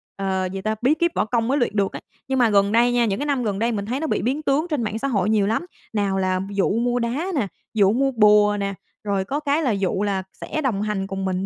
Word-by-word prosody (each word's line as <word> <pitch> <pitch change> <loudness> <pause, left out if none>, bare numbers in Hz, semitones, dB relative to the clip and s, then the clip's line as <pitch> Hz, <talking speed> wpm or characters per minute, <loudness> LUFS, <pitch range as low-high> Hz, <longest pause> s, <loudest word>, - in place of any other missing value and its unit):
ờ, 190 -1 -1
gì 195 - -4
ta 215 +2 -1
bí 260 +5 +4
kíp 340 +2 +1
võ - - +1
công 230 +1 0
mới 275 +3 +1
luyện 240 -5 0
được 200 -2 +1
á. - - -6 0.3
Nhưng 265 0 0
mà 240 -2 +4
gần 200 -1 +3
đây 235 +2 +4
nha, 240 -1 +3
những 200 -2 -1
cái 290 - -2
năm 280 -4 0
gần 205 -3 -2
đây 230 +2 +1
mình 200 -3 -3
thấy 250 +5 -2
nó 320 - -2
bị - - 0
biến 260 +8 -1
tướng 300 +4 +1
trên 295 -7 -1
mạng 215 0 -3
xã 275 - -1
hội 205 -6 +1
nhiều 210 -2 +2
lắm. 225 +11 -1 0.3
Nào 200 -2 0
là 185 -1 0
dụ 200 -1 +1
mua 245 +1 +1
đá 245 +8 -1
nè, 245 -8 0 0.3
dụ 200 -3 +4
mua 270 +3 +1
bùa 210 -3 +5
nè, 200 0 -2 0.3
rồi 200 -2 -1
có 280 +8 -2
cái 295 +1 0
là 260 - +2
dụ 195 -1 0
là 195 -2 -1
sẽ 310 - -4
đồng 235 -9 0
hành 210 -2 -2
cùng 195 0 -4
mình 190 0 -1
215 Hz, 285 wpm, -22 LUFS, 200-255 Hz, 0.3 s, bùa